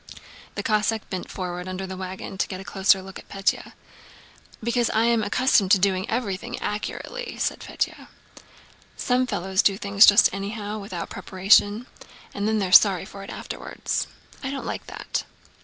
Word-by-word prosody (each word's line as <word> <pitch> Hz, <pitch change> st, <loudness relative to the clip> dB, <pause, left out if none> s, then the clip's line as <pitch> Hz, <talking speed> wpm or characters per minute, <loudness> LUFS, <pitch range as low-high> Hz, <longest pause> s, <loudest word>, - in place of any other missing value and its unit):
The -, -, -3 dB
Cossack 215 Hz, 0 st, 0 dB
bent 185 Hz, -2 st, -4 dB
forward 180 Hz, -1 st, -5 dB
from -, -, -6 dB
under 185 Hz, +1 st, -4 dB
the 190 Hz, 0 st, -6 dB
wagon 190 Hz, +1 st, -6 dB
to -, -, +1 dB
get 185 Hz, -, -6 dB
a -, -, -8 dB
closer 195 Hz, 0 st, +3 dB
look 190 Hz, 0 st, -9 dB
at -, -, -16 dB
Pétya. 195 Hz, -1 st, -1 dB, 0.9 s
"Because 235 Hz, +1 st, +1 dB
I 220 Hz, -, +2 dB
am 235 Hz, -1 st, +3 dB
accustomed 215 Hz, -2 st, +3 dB
to -, -, +7 dB
doing 190 Hz, 0 st, 0 dB
everything 230 Hz, 0 st, -3 dB
accurately," 475 Hz, -, -4 dB
said -, -, -1 dB
Pétya. -, -, -4 dB, 0.9 s
"Some 250 Hz, 0 st, +1 dB
fellows 190 Hz, -2 st, 0 dB
do 195 Hz, -1 st, +2 dB
things 200 Hz, 0 st, +6 dB
just 205 Hz, -, +8 dB
anyhow, 205 Hz, +2 st, -4 dB
without 190 Hz, -4 st, -6 dB
preparation, 205 Hz, +4 st, +3 dB, 0.5 s
and 200 Hz, +1 st, -2 dB
then 220 Hz, 0 st, +1 dB
they're 190 Hz, -3 st, -1 dB
sorry 190 Hz, -2 st, +6 dB
for 195 Hz, 0 st, -10 dB
it 195 Hz, -, -9 dB
afterwards. -, -, -4 dB, 0.3 s
I 270 Hz, -, -3 dB
don't 275 Hz, 0 st, -5 dB
like -, -, -5 dB
that." -, -, -4 dB
200 Hz, 170 wpm, -24 LUFS, 190-220 Hz, 0.9 s, just